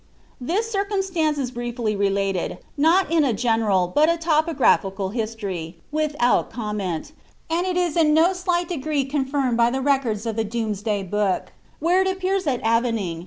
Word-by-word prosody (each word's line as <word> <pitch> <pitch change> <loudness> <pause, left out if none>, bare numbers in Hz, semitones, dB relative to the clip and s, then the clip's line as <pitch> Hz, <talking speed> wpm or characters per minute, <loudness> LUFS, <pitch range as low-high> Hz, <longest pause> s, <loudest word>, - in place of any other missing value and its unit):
This 380 - -1
circumstance 385 -7 0
is 260 -3 -2
briefly 240 -3 -3
related, 195 -2 -1 0.2
not 325 +5 +3
in 330 -2 +4
a 260 -5 +2
general, 220 -4 +2
but 305 +2 +4
a 335 - +2
topogra 315 -3 +3
phical 195 0 -4
history, 200 -8 -4
without 300 -5 +1
comment, 210 - -4 0.4
and 345 +3 +1
it 360 -1 -1
is 350 -4 0
in 320 -3 +4
no 325 +4 +4
slight 355 -1 -1
degree 300 -4 -1
confirmed 270 -3 -1
by 235 0 +4
the 260 - -2
recoitls 255 -6 0
of 225 -1 -3
the 225 - +1
Domesday 215 -2 -2
book, 200 0 -1 0.2
where 350 +4 +2
it 380 - +1
appears 375 0 -1
that 260 -5 -1
Avening, 230 -5 +1
'Chron. 165 - -8
255 Hz, 165 wpm, -23 LUFS, 215-330 Hz, 0.4 s, in